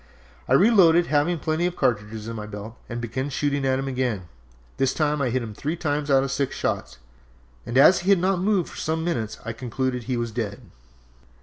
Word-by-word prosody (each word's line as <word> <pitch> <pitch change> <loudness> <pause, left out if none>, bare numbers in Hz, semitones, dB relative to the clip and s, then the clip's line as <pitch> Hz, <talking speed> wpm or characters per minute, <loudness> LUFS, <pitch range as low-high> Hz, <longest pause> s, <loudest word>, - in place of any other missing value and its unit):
I - - +3
reloaded, 175 - +6
having 150 +4 +2
plenty 160 +2 0
of 180 - -4
cartridges 110 -2 -1
in 115 - -5
my 105 -1 -6
belt, 105 +2 -8
and 120 -1 -4
began 125 +4 -3
shooting 140 -1 -1
at 130 0 +2
him 135 0 -3
again. 125 -7 -1 0.5
This 135 -1 +1
time 150 -2 +1
I 130 - +1
hit 125 +1 -1
him 110 -2 -7
three 150 +10 -3
times 150 -3 -2
out 135 -1 +4
of 135 - -3
six 135 0 -1
shots, - - -3 0.7
and 120 - -1
as 175 +7 +7
he 180 - -2
had 200 - +6
not 185 +1 +1
moved 195 -3 +1
for - - -11
some 160 +1 -1
minutes 120 -11 -2
I 115 - -3
concluded 125 +1 -2
that - - -14
he 130 -2 -1
was 120 -1 -2
dead. 105 -1 -4
135 Hz, 215 wpm, -24 LUFS, 120-160 Hz, 0.7 s, as